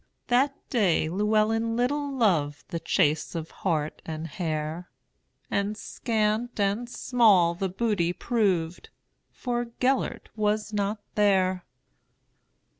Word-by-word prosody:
That 270 +3 +3 0.2
day 185 -10 +2
Llewelyn 215 +4 +1
little 285 +4 0
lovedThe 170 - 0
chase 150 +2 +1
of 165 -1 -5
hart 155 -5 -2
and 160 0 -5
hare; 160 +1 -4 0.6
And 200 +1 0
scant 220 +1 -1
and 205 +4 0
small 215 -10 +4
the 190 +2 -2
booty 190 -3 0
proved, 185 -6 -1 0.4
For 240 -1 -2
Gêlert 260 +1 0
was 215 0 0
not 205 +1 -1
there. 190 -3 +2
205 Hz, 105 wpm, -27 LUFS, 170-230 Hz, 0.6 s, small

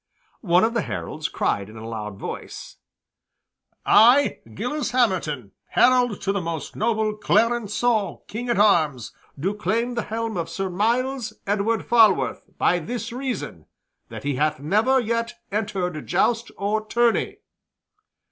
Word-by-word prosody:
One 180 -2 +3
of 225 +1 +2
the 230 - +1
heralds 155 -5 -4
cried 100 0 -1
in 110 - -12
a 110 0 -8
loud 105 -3 -6
voice, - - -7 1.1
"I, 245 +6 +5 0.2
Gilles 290 +3 -2
Hamerton, 170 - 0 0.2
herald 245 -4 +3
to 195 - +1
the 200 -1 -1
most 165 -3 -5
noble 220 -1 0
Clarencieux 220 -1 +1
King 240 +3 -5
at 235 - +1
arms, 155 - +2 0.3
do 190 +8 0
claim 220 +5 -1
the 235 - -1
helm 225 -1 -3
of 165 -1 -3
Sir 195 -1 -3
Myles 240 +6 0
Edward 210 +3 0
Falworth 225 -4 +3
by 175 - +2
this 230 +7 -5
reason, 255 +1 -5 0.4
that - - -8
he 145 -2 -1
hath 150 0 +1
never 215 - +2
yet 230 0 -2 0.2
entered 195 -6 -2
joust 230 +6 +1
or 210 +2 -1
tourney." 235 +1 +1
215 Hz, 140 wpm, -23 LUFS, 175-235 Hz, 1.1 s, I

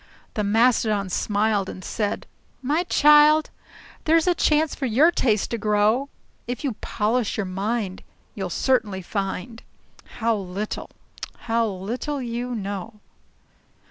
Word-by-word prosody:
The 215 - -1
Mastodon 215 -2 +2
smiled 205 0 0
and 185 - -8
said, 205 -2 -2 0.4
"My 295 +6 +1
child, 300 0 +5 0.5
There's 325 0 +4
a 360 - +4
chance 310 -2 +2
for 270 - -3
your 275 +9 +5
taste 220 - +1
to 235 - -2
grow. 215 +6 +2 0.4
If 245 +2 -4
you 275 -4 -1
polish 225 +1 -1
your 205 - -1
mind, 195 +1 -3 0.3
you'll - - -4
certainly 210 -8 0
find 200 +4 -4 0.6
How 230 -1 +1
little, 195 +1 -5 0.5
how 230 -1 +1
little 225 +9 -4
you 245 0 -3
know." 205 +1 -5
225 Hz, 125 wpm, -24 LUFS, 205-255 Hz, 0.6 s, child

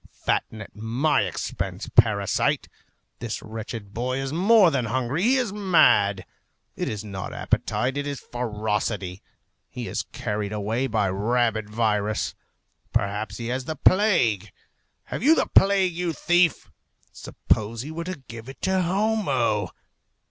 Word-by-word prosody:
Fatten 110 -1 -1
at - - -16
my 115 +7 +1
expense, 95 -4 -4
parasite! 100 -3 +3 0.5
This 115 -2 -4
wretched 110 -2 -7
boy 125 +4 -2
is 135 +1 -3
more 195 +1 +5
than 130 -4 0
hungry; 130 +6 -1
he 245 +6 +4
is 245 -6 0
mad. 105 - +4 0.5
It - - -2
is 105 -1 -4
not 95 -3 -6
appetite, 130 +3 -1
it 145 0 -2
is 140 -2 -4
ferocity. 105 -5 -3 0.5
He - - -6
is - - -2
carried 105 -1 -3
away 110 +5 -1
by 110 -5 +1
a - - -2
rabid 110 +1 0
virus. 105 -1 0 0.6
Perhaps 105 -1 -1
he 115 0 -4
has 125 +1 -2
the 160 - -3
plague. 125 - +3 0.5
Have - - -6
you 305 +7 +6
the - - +2
plague, 195 -2 +4
you 170 -1 -2
thief? 175 +1 +2 0.4
Suppose 110 +2 -2
he 150 - -7
were 165 +1 -5
to 180 -7 -6
give 115 +1 -9
it 135 - -11
to 190 0 +2
Homo! 170 - +1
120 Hz, 145 wpm, -25 LUFS, 105-165 Hz, 0.6 s, you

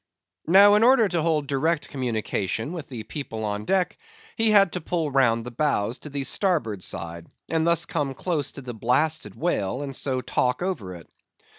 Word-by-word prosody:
Now 200 +4 +7
in 210 - +4
order 240 -3 +5
to 175 -3 -1
hold 155 -2 +1
direct 150 +4 0
communication 110 - -2
with 165 -5 -7
the 120 -5 -6
people 115 -4 -6
on 105 0 -3
deck, 185 - 0 0.4
he 225 0 +3
had 200 -4 +5
to 180 - -4
pull 160 -2 -2
round 115 -4 +3
the 125 - -6
bows 120 -4 0
to 150 - -9
the 140 -1 -3
starboard 135 - 0
side, 85 -1 -4 0.2
and 160 +1 +1
thus 170 -1 +3
come 145 -4 -2
close 150 -5 -2
to 140 - -8
the 125 -2 -7
blasted 145 +8 0
whale; 130 - -1
and 135 -2 -6
so 130 -1 -1
talk 125 +4 0
over 105 - -3
it. 85 - -13
140 Hz, 185 wpm, -25 LUFS, 115-170 Hz, 0.4 s, Now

